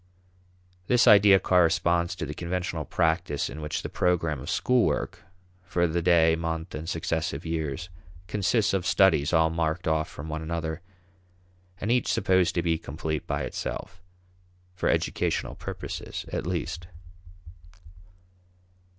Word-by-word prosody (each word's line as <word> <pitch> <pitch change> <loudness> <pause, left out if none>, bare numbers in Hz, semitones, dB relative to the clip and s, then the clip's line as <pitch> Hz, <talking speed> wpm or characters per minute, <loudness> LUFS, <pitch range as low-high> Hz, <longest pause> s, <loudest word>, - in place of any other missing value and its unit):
This 125 -1 +4
idea 100 -1 +7
corresponds 85 0 +2
to 80 - -4
the 75 - -5
conventional 85 -1 -3
practice 80 0 0
in 80 - -7
which 75 0 -3
the - - -3
program 85 -5 0
of - - -7
school 125 -2 +2
work, 95 - -1 0.4
for 90 -1 0
the 85 +1 0
day, 80 -2 +4
month, 80 +1 -4
and 80 +2 -5
successive 80 -2 -2
years, 80 +1 -3 0.4
consists 105 +4 +1
of 95 -2 +1
"studies" 80 -6 +4
all 80 -1 +3
marked 80 +1 -1
off 80 -1 +1
from 70 - -8
one 80 0 -4
another, 80 0 -3 1.0
and 105 - -1
each 125 -1 +2
supposed 95 -3 +2
to 85 - +1
be 80 -2 +1
complete 80 0 -4
by - - -1
itself 95 -2 -5 0.7
for 90 - -1
educational - - 0
purposes - - -6
at - - -2
least. 85 0 -3
85 Hz, 135 wpm, -27 LUFS, 80-90 Hz, 1.0 s, idea